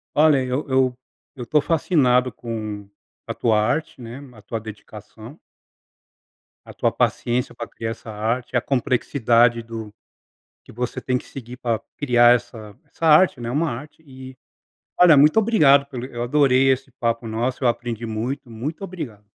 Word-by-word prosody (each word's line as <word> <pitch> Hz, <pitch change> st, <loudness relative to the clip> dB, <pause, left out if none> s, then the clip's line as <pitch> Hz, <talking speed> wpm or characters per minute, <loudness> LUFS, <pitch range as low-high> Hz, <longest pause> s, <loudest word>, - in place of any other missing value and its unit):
Olha, 150 Hz, -3 st, +4 dB
eu 130 Hz, +4 st, -3 dB
eu 130 Hz, -1 st, +1 dB, 0.4 s
eu 125 Hz, -2 st, -7 dB
tô 150 Hz, +3 st, +2 dB
fascinado 130 Hz, -7 st, +2 dB
com 110 Hz, -3 st, -6 dB, 0.4 s
a -, -, -3 dB
tua 110 Hz, -3 st, +1 dB
arte, 145 Hz, +4 st, -2 dB
né, 120 Hz, +2 st, -8 dB, 0.2 s
a 110 Hz, -, -15 dB
tua 110 Hz, +2 st, -5 dB
dedicação 110 Hz, +4 st, -12 dB, 1.3 s
a -, -, -12 dB
tua -, -, 0 dB
paciência 120 Hz, +1 st, -1 dB
pra 115 Hz, -, -6 dB
criar 115 Hz, 0 st, -5 dB
essa 115 Hz, 0 st, -9 dB
arte, 115 Hz, +4 st, -3 dB
a -, -, +1 dB
complexidade 120 Hz, -3 st, +1 dB
do 115 Hz, -2 st, -8 dB, 0.7 s
que -, -, -15 dB
você 120 Hz, +2 st, -4 dB
tem 125 Hz, -1 st, 0 dB
que -, -, -10 dB
seguir 125 Hz, -1 st, -10 dB
pra 115 Hz, -3 st, -2 dB, 0.2 s
criar 120 Hz, -3 st, +5 dB
essa 110 Hz, -4 st, -8 dB
essa 165 Hz, -, -6 dB
arte, 155 Hz, -3 st, +5 dB
né, 115 Hz, -, -4 dB
é -, -, -3 dB
uma 155 Hz, +5 st, 0 dB
arte 145 Hz, +6 st, -9 dB
e, 130 Hz, -1 st, -12 dB, 0.6 s
olha, 175 Hz, -4 st, +7 dB
muito 150 Hz, +7 st, +5 dB
obrigado 150 Hz, -11 st, +4 dB
pelo 125 Hz, -4 st, -7 dB
eu 120 Hz, -2 st, -6 dB
adorei 135 Hz, 0 st, +3 dB
esse 130 Hz, +1 st, -1 dB
papo 115 Hz, -2 st, -2 dB
nosso, 120 Hz, +4 st, -2 dB
eu 120 Hz, -, +5 dB
aprendi 120 Hz, -1 st, -3 dB
muito, 120 Hz, +4 st, -4 dB
muito 145 Hz, -, -6 dB
obrigado. 140 Hz, -, -8 dB
125 Hz, 165 wpm, -22 LUFS, 115-140 Hz, 1.3 s, olha